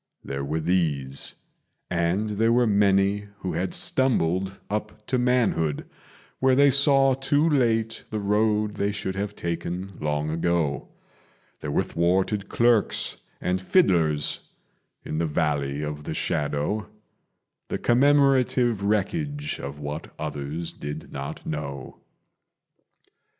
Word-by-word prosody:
There 70 0 -4
were 75 +3 -2
these, 75 -6 -1 0.5
and 90 +5 0
there 115 +1 +4
were 120 +1 +4
many 100 -1 +2
who 90 -2 -3
had 90 +3 -1
stumbled 95 -7 +1
up 105 +1 -4
to 130 - 0
manhood, 120 - +1 0.5
Where 130 0 +4
they 140 +1 +6
saw 135 -1 +5
too 145 +4 +1
late 115 -6 +1
the 110 - -3
road 105 +1 +1
they 100 +1 +1
should 100 -2 -3
have 100 +1 -4
taken 85 +2 -4
long 75 0 -1
ago: 80 -3 0 0.7
There 75 - -5
were 70 - +1
thwarted 95 +4 0
clerks 120 -3 +2 0.2
and 90 +1 -1
fiddlers 85 - +2 0.7
in 75 - -3
the 85 - +1
Valley 75 -2 -1
of 75 -1 -5
the - - -4
Shadow, 75 +8 -1 0.8
The - - -2
commemorative 130 -3 +3
wreckage 145 - -1
of 70 +1 -6
what 75 +2 -6
others 75 +2 -4
did 75 +2 -7
not 70 0 -6
know. 70 -3 -5
95 Hz, 120 wpm, -25 LUFS, 75-115 Hz, 0.8 s, they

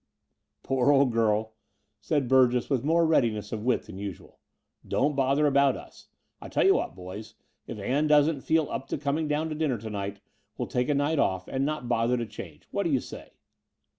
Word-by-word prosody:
"Poor 135 +1 +2
old 140 -2 +4
girl," 110 -1 +1 0.5
said 145 -5 -1
Burgess 125 0 +3
with 135 -3 +1
more 165 +3 +3
readi 145 -8 +3
ness 105 -1 -7
of 110 - -3
wit 125 0 +1
than 95 - -10
usual, 100 -4 -8 0.5
"don't 145 +1 +1
bother 140 +2 +2
about 140 -2 +3
us. - - -14 0.3
I - - -8
tell - - +1
you - - +6
what, - - -2
boys, 100 +4 -9 0.3
if - - -6
Ann 135 +9 0
doesn't 150 -1 +3
feel 160 +1 +1
up 135 - -4
to - - -3
com 140 +1 -1
ing 160 - -1
down 150 +2 0
to - - -3
dinner 150 -5 0
to 110 +1 -7
night, 100 -1 -4 0.4
we'll - - -3
take 125 +2 -1
a 145 - +2
night 145 +2 +1
oflF 95 -1 0
and 135 +1 -1
not 155 -5 -3
bother 120 +1 +1
to 120 - -2
change. 80 -8 -10
What 200 - -1
do 175 - 0
you 135 -4 +2
say - - -10
130 Hz, 210 wpm, -27 LUFS, 110-150 Hz, 0.5 s, you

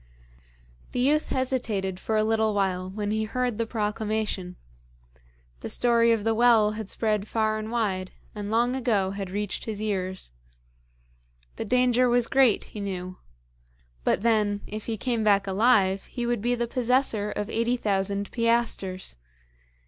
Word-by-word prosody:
The 250 - -1
youth 295 +5 +2
hesitated 225 -8 -1
for 220 +2 -1
a 215 - +3
little 220 -1 +1
while 185 -2 0
when 205 +1 -3
he 220 0 0
heard 245 0 -2
the 230 - 0
proclamation. 210 -4 -2 1.0
The - - -6
story 235 -1 +3
of 225 -3 +1
the 225 +1 +2
well 225 -2 +5
had 215 -2 -6
spread 215 -2 -1
far 215 -1 0
and 215 0 -5
wide, 200 -6 -1 0.2
and 205 -1 -5
long 240 +3 +2
ago 215 -7 +1
had 195 -1 -5
reached 205 +1 -3
his 215 -2 -4
ears. 190 - -3 1.3
The - - -3
danger 250 +1 +3
was 240 0 +3
great, 260 -3 +3
he 215 - -10
knew; 185 -2 -5 0.8
but 175 - +1
then, 210 -3 +2
if 215 0 -7
he 225 -1 -2
came 235 0 -1
back 200 -2 +3
alive, 195 -1 +3
he 240 -2 -4
would 240 -3 0
be 240 +2 +1
the 240 0 -1
possessor 240 -3 +1
of 210 0 -3
eighty 230 +2 +1
thousand 200 -2 -1
piastres. 230 - -1
215 Hz, 155 wpm, -26 LUFS, 200-235 Hz, 1.3 s, well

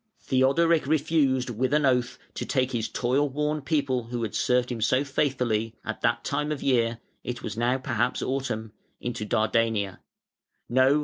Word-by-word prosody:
] - - -42
Theodoric 140 +4 +3
refused 140 -4 +2
with 130 +5 0
an 150 -1 +3
oath 125 -2 +1 0.2
to - - -4
take 130 -2 0
his 115 -2 -2
toil 135 +4 +1
worn 150 +2 -1
people 140 -4 0
who 120 0 -4
had 110 - -3
served 125 0 +1
him 115 -2 -4
so 130 +5 +3
faithfully, 125 -6 0
at 110 -1 -4
that 120 0 +1
time 150 +1 -1
of 150 - -3
year 120 -3 +2 0.3
(it 125 -1 -5
was 105 - -4
now 120 +3 +1
perhaps 125 -2 -1
autumn) 120 -5 -2 0.3
into 120 -3 -4
Dardania. 110 -3 +1 0.7
No! 130 +4 +4
125 Hz, 170 wpm, -26 LUFS, 115-140 Hz, 0.7 s, No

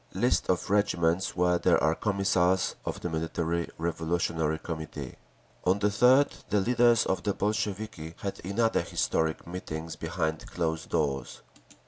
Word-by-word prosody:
List - - +1
of 90 +1 0
regiments 90 -3 +1
where 90 0 +2
there - - +4
are 80 - +4
Commissars 95 -2 +1
of - - -4
the 90 - -2
Military 80 +1 -1
Revolutionary 80 -1 -1
Committee…. 80 -1 -6 0.5
On 90 +2 +3
the 105 0 +2
3rd 130 +7 +4
the 105 +2 +3
leaders 120 +2 +4
of 95 - 0
the 100 -2 -1
Bolsheviki 105 -5 -2
had 100 -3 -5
another 115 +5 +1
historic 80 -1 -1
meeting 85 -2 -6
behind 80 -1 -2
closed 80 -1 -2
doors. 70 -3 -1
90 Hz, 135 wpm, -28 LUFS, 80-100 Hz, 0.5 s, there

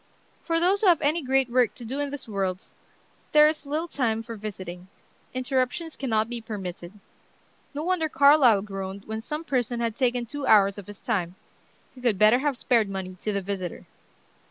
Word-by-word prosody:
For 330 -1 +1
those 375 +4 +2
who 420 - +3
have 345 -4 +6
any 310 +4 +2
great 265 -1 +2
work 245 -2 +2
to 240 - -8
do 265 +5 -4
in 290 0 -1
this 285 -3 -7
worlds 195 -3 -3 0.6
there 300 0 +8
is 305 -2 -2
little 310 +4 -2
time 225 -7 -1
for 230 0 -7
visiting; 185 -4 -7 0.4
interruptions 260 +5 -2
cannot 220 -5 0
be 240 0 -5
permitted. 190 -5 -7 0.8
No 295 - -3
wonder 340 -2 0
Carlyle 280 -8 +5
groaned 195 -1 -6
when 220 0 -4
some 300 +7 -5
person 245 -5 -1
had 230 -2 -1
taken 245 -2 0
two 285 +4 -5
hours 200 -1 +5
of 195 - -11
his 205 0 -11
time. 185 -6 -2 0.6
He 255 - -14
could 235 -5 +2
better 215 +5 +5
have 285 -2 -1
spared 230 -4 +2
money 190 -1 -5
to 215 - -2
the 200 -1 -1
visitor. 185 -3 -5
235 Hz, 185 wpm, -26 LUFS, 200-285 Hz, 0.8 s, there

